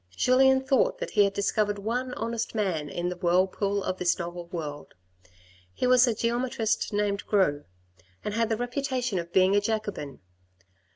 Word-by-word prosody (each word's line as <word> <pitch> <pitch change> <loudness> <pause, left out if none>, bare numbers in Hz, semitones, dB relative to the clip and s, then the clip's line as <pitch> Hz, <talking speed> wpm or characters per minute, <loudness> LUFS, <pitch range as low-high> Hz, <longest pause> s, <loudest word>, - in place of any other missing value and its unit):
Julien 265 +1 +4
thought 265 - +2
that - - -5
he 205 - +4
had 200 - -1
discovered 205 +1 0
one 245 +5 -3
honest 230 0 -3
man 175 -9 -1
in 175 +3 -2
the 180 - -4
whirlpool 190 +3 +1
of 185 - -3
this 180 -1 +2
novel 175 0 -6
world. 155 -5 -7 0.8
He - - -1
was 250 0 +5
a 230 - +1
geometrist 230 -1 -1
named 205 -1 -1
Gros, 185 -9 +2 0.6
and 210 - -2
had 230 0 0
the 225 - 0
reputation 245 -3 -2
of 170 0 -7
being 190 +2 +4
a 205 - +4
Jacobin. 205 -9 -3
205 Hz, 165 wpm, -27 LUFS, 185-240 Hz, 0.8 s, was